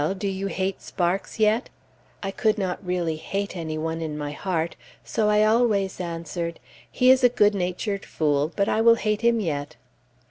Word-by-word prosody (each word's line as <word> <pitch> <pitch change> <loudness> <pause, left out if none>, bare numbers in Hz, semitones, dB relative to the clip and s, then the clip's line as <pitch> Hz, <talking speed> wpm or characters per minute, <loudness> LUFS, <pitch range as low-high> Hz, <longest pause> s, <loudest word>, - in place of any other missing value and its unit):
do 200 - -2
you 195 0 -2
hate 190 +1 -2
Sparks 180 +4 -2
yet?" 220 +3 +2 0.5
I 195 - -2
could 215 +1 +1
not 190 -1 -2
really 175 -3 -1
hate 200 +4 -3
any 160 -3 -4
one 160 +1 -3
in 155 -2 -4
my 145 -1 -4
heart, 170 0 -2 0.3
so 215 -1 0
I 210 0 +4
always 215 -4 +2
answered, 170 0 -4 0.3
"He 255 0 +4
is 260 0 +4
a 245 - +7
good 210 -3 +3
natured 195 +2 -2
fool, 150 0 0
but 200 -1 +1
I 220 - +2
will 230 0 +7
hate 210 -1 -1
him 235 -1 +3
yet." 150 -5 -3
190 Hz, 180 wpm, -25 LUFS, 165-215 Hz, 0.5 s, a